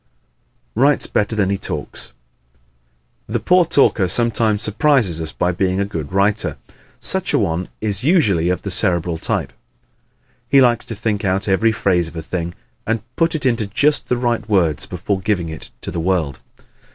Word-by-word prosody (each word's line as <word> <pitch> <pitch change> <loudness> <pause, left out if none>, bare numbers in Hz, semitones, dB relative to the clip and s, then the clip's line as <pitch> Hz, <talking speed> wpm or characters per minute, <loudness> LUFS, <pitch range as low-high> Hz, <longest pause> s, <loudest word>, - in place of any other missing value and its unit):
Writes 140 +5 +3
Better 105 +2 -1
than 100 -2 +1
He 100 - -1
Talks 65 - -6 1.2
¶ - - -8
The 120 - 0
poor 180 - +4
talker 135 - +3
sometimes 110 0 +1
surprises 110 - +2
us 80 -1 -5
by 90 - 0
being 95 +1 0
a 100 - +1
good 80 -6 -5
writer. 100 +2 0 0.4
Such 190 0 +3
a - - +4
one 90 -3 -1
is 105 -1 -2
usually 105 - +3
of 90 0 -1
the 100 - -4
Cerebral 85 -2 0
type. - - -2 1.0
He 140 - +6
likes 120 -3 +3
to 115 - -5
think 105 -1 -2
out 95 +1 0
every 105 +4 +3
phase 90 -6 +1
of 80 - -11
a 80 - -5
thing 85 0 -4 0.3
and 115 +1 -1
put 165 0 +1
it 150 - -3
into 115 -5 +1
just 145 +9 +1
the 125 - +1
right 120 -3 -1
words 85 -8 +1
before 95 +2 -3
giving 90 -4 -1
it 80 - -8
to - - -6
the 85 - -3
world. 80 -6 -1
100 Hz, 175 wpm, -19 LUFS, 90-115 Hz, 1.2 s, He